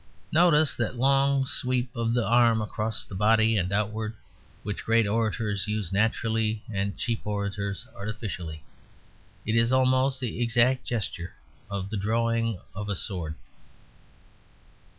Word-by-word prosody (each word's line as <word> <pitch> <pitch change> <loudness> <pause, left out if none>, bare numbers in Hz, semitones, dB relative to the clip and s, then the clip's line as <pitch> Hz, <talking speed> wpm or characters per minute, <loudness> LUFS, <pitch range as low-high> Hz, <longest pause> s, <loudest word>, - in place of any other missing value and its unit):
Notice 155 -5 +4
that 120 +1 -1
long 135 +1 +3
sweep 125 -1 -2
of 115 0 0
the 120 - +1
arm 115 +1 +4
across 110 +1 -2
the - - -11
body 110 +3 +3
and 90 -2 0
outward, 110 +2 -1 0.5
which 105 -1 -4
great 115 0 +3
orators 105 -2 0
use 105 -4 -2
naturally 110 +1 0
and 100 0 -2
cheap 115 -2 -2
orators 100 -1 -2
artificially. 100 -7 -5 0.8
It 110 - 0
is 115 +1 +4
almost 130 0 +3
the 120 -2 -3
exact 120 +2 +3
gesture 100 -6 -4 0.3
of 100 -1 -4
the 110 - -2
drawing 115 0 0
of 105 +1 -5
a 100 - 0
sword. 85 -5 -3
110 Hz, 130 wpm, -27 LUFS, 100-120 Hz, 0.8 s, Notice